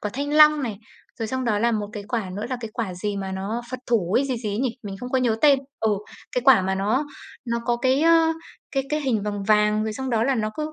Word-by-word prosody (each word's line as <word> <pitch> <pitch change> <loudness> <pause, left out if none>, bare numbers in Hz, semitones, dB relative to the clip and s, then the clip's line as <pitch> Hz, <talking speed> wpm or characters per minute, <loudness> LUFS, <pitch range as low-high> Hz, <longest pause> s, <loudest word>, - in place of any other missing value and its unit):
quả 210 - -3
thanh 285 +2 -2
long 305 -1 +7
này. 225 -6 -3 0.4
Rồi 225 - -2
xong 260 +1 -2
đó 215 -3 +1
là 235 +2 +2
một 210 -2 -2
cái 210 - -6
quả 220 -6 -2
nữa 210 - -3
là 255 - -1
cái 225 -2 -6
quả 220 -7 -3
gì 205 +3 -3
mà 195 -1 -4
nó 200 +5 -3
phật 255 - -4
thủ 200 -7 +1
ấy, 275 - +1
gì 260 -2 -2
gì 225 -3 -4
ấy 205 - -2
nhỉ? 255 0 +1
Mình 200 -2 -6
không 250 - -6
có 260 - +2
nhớ 240 -3 +1
tên. 285 -2 +6 0.2
Ừ, 220 - +2 0.4
cái 250 - 0
quả 265 -8 +7
mà 190 +1 0
nó 215 +9 0 0.6
có 240 -1 +2
cái, 260 +3 +2
ơ, 330 0 +5 0.4
cái 270 - 0
cái 300 0 0
hình 250 -7 0
vàng 205 -1 -3
vàng 210 +1 +3
rồi 220 - -2
xong 265 +3 -4
đó 225 -1 +2
là 270 +2 +2
nó 215 -3 -1
cứ 310 0 -3
230 Hz, 275 wpm, -24 LUFS, 210-265 Hz, 0.6 s, long